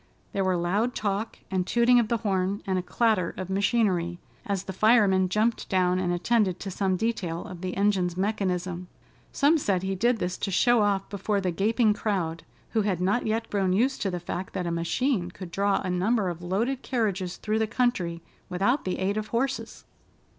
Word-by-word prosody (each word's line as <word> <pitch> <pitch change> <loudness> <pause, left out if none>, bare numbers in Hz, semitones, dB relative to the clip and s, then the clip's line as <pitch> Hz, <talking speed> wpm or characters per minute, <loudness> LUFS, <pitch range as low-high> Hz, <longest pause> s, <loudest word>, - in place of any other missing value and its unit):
There 195 - 0
were 185 -1 +1
loud 200 +8 0
talk, 210 +2 -2
and 185 -1 0
tooting 240 +1 +4
of 235 - +1
the 235 - +1
horn, 195 -2 -1
and 190 -1 0
a - - -1
clatter 210 -2 +1
of 185 0 -5
machinery, 190 -4 +1 0.3
as 200 -2 -1
the 190 - -6
fireman 195 -3 +4
jumped 220 +4 0
down 185 -1 +2
and 180 -1 0
attended 185 +1 +1
to 195 - -4
some 190 0 0
detail 180 -6 -2
of 175 -2 -9
the 185 0 -4
engine's 190 -3 +1
mechanism. 185 -3 -1 0.4
Some 300 +3 +3
said 190 -8 0
he 190 0 -1
did 235 +5 +2
this 180 -2 -3
to - - -2
show 240 +5 +4
off 200 -2 +1
before 200 +1 -1
the 185 -2 -1
gaping 215 +4 +2
crowd, 180 -7 -2 0.3
who 225 - +2
had 195 -4 0
not 200 +6 +1
yet 225 +1 -1
grown 195 -3 +1
used 255 +7 +1
to 200 - 0
the 180 -1 -3
fact 175 +2 -5
that 180 - -2
a 170 - -1
machine 175 +4 0
could 180 -1 -9
draw 200 +2 +1
a 185 - -2
number 195 +2 +1
of 175 -1 -6
loaded 225 +9 -1
carriages 200 -7 -1
through 215 0 -1
the 220 - +1
country, 185 -8 0 0.3
without 200 +10 +1
the 185 - -1
aid 195 +2 -1
of 215 0 -2
horses. 265 +4 -2
195 Hz, 195 wpm, -27 LUFS, 180-220 Hz, 0.4 s, tooting